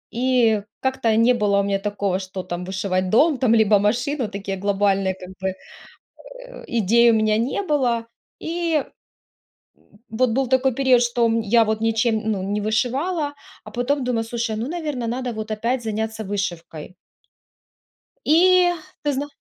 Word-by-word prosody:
и 240 -4 +2 0.2
как-то 260 -4 0
не 230 +2 +5
было 205 -3 +2
у - - +2
меня 195 0 0
такого, 200 -2 -2
что 185 -1 -6
там 180 0 -5
вышивать 185 -1 -2
дом 295 +6 +4
там, 235 -4 +3
либо 215 -2 +4
машину. 245 +5 0
Такие 195 -1 -5
глобальные 195 -1 +1
как 185 -1 -11
бы, 190 - 0 1.0
э, - - -12
идей 235 +1 +4
у - - +3
меня 215 -1 +2
не 250 - -1
было. 255 -9 0 0.4
И. 330 -3 -1 0.9
М. 205 - -26
Вот 245 +3 +1
был 265 +3 0
такой 260 +1 +2
период, 260 -2 +4
что, 240 0 +1
м, 230 0 +1
я 225 +2 +4
вот 220 0 -1
ничем, 225 0 +1
ну 190 -3 -2
не 205 +2 -2
вышивала, 280 - -1 0.3
а - - -11
потом 260 +3 -1
думаю, 240 -2 -1
слушай, 230 -1 -3
ну, 230 +4 -3
наверное, 300 -8 -4
надо 245 +1 -3
вот 215 0 -6
опять 235 +4 -1
заняться 220 0 -3
вышивкой. 180 -4 -5 1.3
И 355 +3 +5 0.3
ты 290 - 0
зна 280 +2 -2
230 Hz, 160 wpm, -22 LUFS, 205-260 Hz, 1.3 s, не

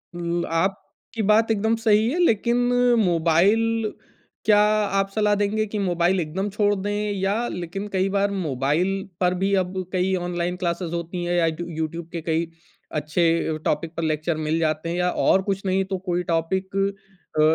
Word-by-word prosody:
ल 170 0 -2
आप 190 +3 0 0.3
की 225 - -2
बात 220 +1 +4
एकदम 220 +1 +1
सही 220 -1 +3
है 340 - -1
लेकिन 235 -3 +2 0.5
मोबाइल 200 +7 +2 0.5
क्या 210 -1 +5 0.4
आप 195 0 0
सलाह 210 0 +2
देंगे 205 +2 0
कि 210 0 -4
मोबाइल 180 -1 +1
एकदम 180 +5 -2
छोड़ 205 0 +1
दें? 205 +1 -2
या 205 +5 0
लेकिन 180 +4 -5
कई 190 0 +2
बार 200 +1 +1
मोबाइल 175 +3 -1
पर 180 -1 +2
भी 195 +1 +1
अब 180 - -9 0.2
कई 185 +1 +1
ऑनलाइन 175 0 -2
क्लासेज़ 170 -1 -2
होती 170 +1 -4
हैं 175 0 0
या 170 - +3
यूट 160 0 -2 0.2
यूट्यूब 160 +1 -3
के 170 - -4
कई 165 +1 -1 0.4
अच्छे 155 +3 -1 0.3
अ, - - -4
टॉपिक 160 +2 -1
पर 165 - -1
लेक्चर 155 +1 -1
मिल 160 +2 +1
जाते 155 0 -1
हैं 170 - -2
या 180 0 +1 0.2
और 190 - +5
कुछ 195 0 -2
नहीं 190 0 +2
तो 190 0 -3
कोई 175 0 0
टॉपिक 190 +4 -1 0.6
अ, - - +6
185 Hz, 180 wpm, -23 LUFS, 170-205 Hz, 0.6 s, अ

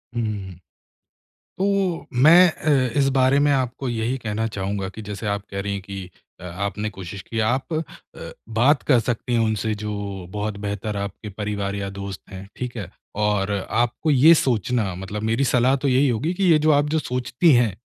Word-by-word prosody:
हुँ, 105 -5 -3 1.0
तो 195 -3 0
मैं 165 +8 +7
अ, 135 -6 +1
इस 135 - +3
बारे 130 +2 +4
में 145 0 +3
आपको 130 -1 -1
यही 120 +2 -1
कहना 110 -2 -2
चाहूँगा 100 -2 -3
कि 110 - -9
जैसे 105 +1 -6
आप 100 0 -1
कह 100 - -3
रही 100 0 -3
हैं 100 - -4
कि 95 -1 -8 0.3
अ, - - -12
आपने 100 +4 -3
कोशिश 95 -1 -8
की 115 - -5
आप 125 +8 0
अ, 155 - +1 0.7
बात 125 +6 +3
कर 125 -4 +4
सकती 120 +1 -2
हैं 120 - +3
उनसे 110 -1 0
जो 100 -3 -4
बहुत 105 +1 -3
बेहतर 105 +1 -3
आपके 100 +1 -5
परिवार 100 -1 -3
या 100 -1 -3
दोस्त 100 -1 -7
हैं, 95 0 -9
ठीक 125 -1 -5
है? 100 -5 -5 0.3
और 105 -1 0 0.2
आपको 120 +7 0
ये 145 +4 +7
सोचना 115 - 0
मतलब 95 +3 -6
मेरी 115 +4 +1
सलाह 130 +1 +3
तो 140 - +1
यही 130 +2 +3
होगी 130 +9 -1
कि 195 +2 -2
ये 160 - +7
जो 155 +1 +3
आप 145 0 +3
जो 160 +1 +1
सोचती 125 +5 +1
हैं, 120 -3 +4
110 Hz, 190 wpm, -23 LUFS, 100-130 Hz, 1.0 s, मैं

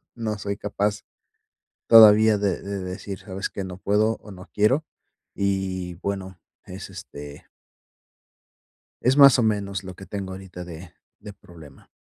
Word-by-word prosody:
no 110 -2 -3
soy 100 0 -4
capaz 100 0 -2 0.8
todavía 110 -1 +8
de 100 -3 -1
de 100 0 -5
decir: 95 +1 -6
"¿Sabes 95 -1 -5
qué? 100 - -6
No 90 -1 -7
puedo, 105 +3 +1
o 105 - -14
no 90 +1 -12
quiero", 125 +9 +2 0.5
y 95 -3 -2
bueno, 95 -2 -4 0.3
es, - - -9
este 70 0 -10 1.6
es 130 +3 +3
más 140 -3 +8
o 120 - +2
menos, 100 -3 -1
lo 95 -1 -8
que 95 - -11
tengo 95 0 -6
ahorita 95 -1 -9
de 85 0 -11 0.3
de 105 0 -10
problema. 85 -7 -16
100 Hz, 145 wpm, -24 LUFS, 95-105 Hz, 1.6 s, todavía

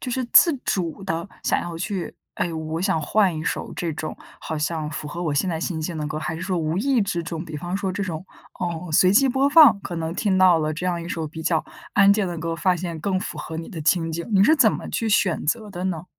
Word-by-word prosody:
就 250 - -4
是 255 +1 -1
自 340 - +8
主 180 0 -2
地 165 +3 -3
想 - - +1
要 170 -1 -6
去 190 0 -4 0.2
诶， 175 - -1
我 160 0 -4
想 190 -3 +1
换 190 +2 +2
一 155 - -5
首 - - -3
这 170 -2 -2
种 155 +1 -5 0.2
好 160 - -4
像 155 0 -2
符 150 0 -6
合 170 +4 -5
我 155 -4 -1
现 185 +6 +1
在 160 -2 -2
心 170 -2 -2
境 165 +1 -4
的 150 - -2
歌， 155 0 -4
还 160 +1 -3
是 165 - -7
说 185 -1 -2
无 160 +2 -1
意 260 0 +2
之 185 -4 -2
中， 165 0 -5
比 155 -2 -9
方 175 +5 -3
说 195 -2 -2
这 200 - -3
种， 175 -2 -4 0.4
嗯， 170 -1 -3
随 185 +4 +5
机 270 +5 +5
播 265 +2 +2
放， 290 -7 +7
可 175 - -6
能 165 0 -3
听 190 -1 +1
到 185 -3 +6
了 155 -1 -1
这 170 +4 -4
样 175 -2 -1
一 170 - -7
首 165 -3 -3
比 160 +1 -8
较 160 -1 +1 0.3
安 200 -1 +6
静 200 -1 +3
的 175 -1 -4
歌， 165 +1 -3
发 185 +1 +2
现 170 -2 -5
更 185 +2 -1
符 - - -6
合 160 - -6
你 165 - -6
的 175 -7 -7
情 165 +1 +2
景， 170 +1 -4
你 195 -1 +5
是 315 +8 +5
怎 220 -7 +5
么 - - -5
去 225 - -2
选 190 -4 +2
择 215 +7 -1
的 180 0 -5
呢？ 175 -2 -2
175 Hz, 285 characters per minute, -23 LUFS, 160-195 Hz, 0.4 s, 自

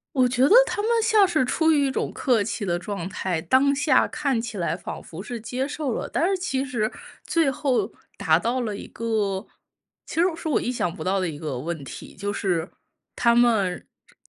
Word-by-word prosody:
我 255 -2 +4
觉 245 +1 +1
得 295 - +6
他 - - -3
们 450 - +1
像 435 -3 +5
是 315 -7 +2
出 320 +6 +2
于 285 -3 +3
一 - - -1
种 - - -2
客 235 -6 +2
气 215 +1 -4
的 175 -3 0
状 185 0 -5
态， 185 -3 -2
当 265 +11 +3
下 275 -1 +3
看 280 -5 -1
起 225 -2 -5
来 170 -1 -1
仿 175 - -7
佛 170 +4 -9
是 235 +1 -6
接 255 +4 -3
受 290 -2 -3
了， - - -3
但 335 - 0
是 390 - +1
其 270 -7 -1
实 235 -5 -1 0.3
最 330 -5 +2
后 250 -6 0 0.2
达 165 -5 +3
到 235 +8 -1
了 215 -4 -3
一 - - -8
个 215 -4 -2 0.6
其 - - -8
实 - - +5
是 330 - -6
我 305 - +2
意 245 - -1
想 180 -9 -1
不 - - -6
到 190 +1 +1
的 185 - 0
一 150 -3 -6
个 150 -5 -4
问 155 +3 -4
题， - - -9
就 200 +1 -3
是 180 -4 -1 0.5
他 235 -1 +3
们， 220 -7 +2 0.2
这 - - -25
230 Hz, 235 characters per minute, -24 LUFS, 190-270 Hz, 0.6 s, 得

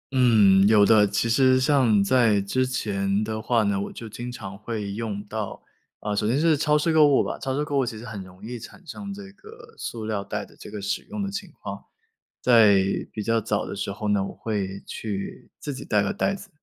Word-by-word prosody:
嗯， 105 -6 +5
有 105 -2 +6
的， 105 -2 +5
其 100 +3 0
实 130 +2 +4
像 130 -7 +3
在 115 -2 +3
之 130 +6 0
前 100 -4 -1
的 110 0 -3
话 115 0 +2
呢， 100 -1 0
我 - - -5
就 115 - -8
经 120 +3 -6
常 105 -6 -8
会 105 -2 -4
用 105 -1 -4
到。 105 -1 -6 0.4
啊， 105 0 -2
首 105 +1 0
先 120 - +2
是 160 0 +4
超 150 0 +2
市 165 +2 +1
购 155 -2 +6
物 140 -2 +4
吧， - - -4
超 135 0 -2
市 150 - 0
购 145 -2 -1
物 130 - +2
其 115 -2 -5
实 115 - -9
很 105 -3 -6
容 90 0 -16
易 120 0 -6
产 175 +10 -13
生 200 +5 -7
这 195 -1 -10
个 450 - -15
塑 115 -2 -5
料 110 -2 -2
袋 - - -4
的 - - -20
这 - - -11
个 105 -1 -6
使 100 - -2
用 215 -1 -5
的 195 - -3
情 200 0 -5
况。 - - -7 0.6
在 110 -6 +6 0.3
比 105 - -5
较 115 +2 +2
早 105 -1 -1
的 - - -6
时 100 - -3
候 105 +2 -5
呢， 100 -1 +2
我 - - -6
会 100 -3 -4
去 100 -3 -6
自 145 - -5
己 130 - -7
带 105 -2 +2
个 100 - -1
袋 195 - 0
子， 200 +1 -11
110 Hz, 250 characters per minute, -25 LUFS, 100-135 Hz, 0.6 s, 有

